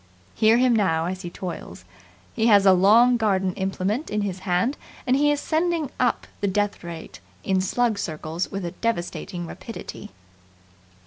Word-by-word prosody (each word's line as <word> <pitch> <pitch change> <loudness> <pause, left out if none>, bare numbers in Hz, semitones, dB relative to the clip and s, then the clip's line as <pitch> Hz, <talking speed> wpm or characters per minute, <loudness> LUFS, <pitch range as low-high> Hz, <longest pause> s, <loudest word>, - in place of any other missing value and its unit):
Hear 220 +1 +4
him 250 -1 +4
now 165 -6 +1
as 185 +1 -4
he 175 - -6
toils. 180 0 -7 0.5
He 225 -1 +1
has 205 -3 +6
a 190 - +8
long 225 +7 +5
garden 195 -4 +1
implement 195 - -2
in 210 0 -1
his 190 -2 -3
hand, 180 +11 +1 0.3
and 255 - +3
he 295 +2 +3
is 290 - 0
sending 320 -2 0
up 250 -1 +1
the 200 - 0
death 205 0 -1
rate 170 - -8 0.2
in 190 -1 +1
slug 220 +2 0
circles 160 0 -3
with 195 -2 -4
a 170 - -3
devastating 180 -3 -3
rapidity. 185 - -8
200 Hz, 165 wpm, -24 LUFS, 180-235 Hz, 0.5 s, a